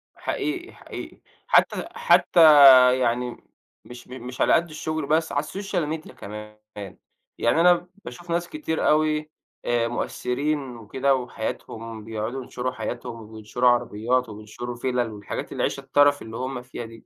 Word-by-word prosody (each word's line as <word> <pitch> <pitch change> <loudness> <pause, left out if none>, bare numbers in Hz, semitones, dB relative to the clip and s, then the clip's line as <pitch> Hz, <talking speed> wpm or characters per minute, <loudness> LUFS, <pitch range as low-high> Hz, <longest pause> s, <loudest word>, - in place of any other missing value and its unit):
حقيقي، 350 +4 -4
حقيقي، - - -10 0.3
حتى - - +3
حتى 470 - +3 0.6
يعني 125 0 -1 0.5
مش 120 0 -12
م 125 -1 -9
مش 125 0 -6
على - - +4
قد 170 +1 +2
الشغل 155 -1 -4
بس، 160 +2 +1
على 145 +1 0
الsocial 165 -4 -3
media - - -12
كمان، 105 +1 -10 0.8
يعني 120 +8 +2
أنا 175 0 +4 0.2
باشوف 170 +8 -10
ناس 170 +1 -1
كتير 300 - -2
أوي 155 0 +1 0.4
آآ، 120 -1 +1
مؤثّرين 130 +2 -3
وكده 130 +5 0
وحياتهم 115 -2 -6
بيقعُدوا 115 +4 -4
ينشُروا 125 +1 -4
حياتهم 110 -1 -6
وينشُروا 110 +3 +1
عربيات 120 +1 0
وبينشُروا 110 +3 -7
فِلَل 120 -2 -1
والحاجات 105 -1 -6
العيشة 140 - -2
الترَف 145 +1 +3
اللي 110 0 -8
هُم 130 -1 -4
فيها 125 -1 -8
دي، 115 0 -14
125 Hz, 140 wpm, -24 LUFS, 115-155 Hz, 0.8 s, على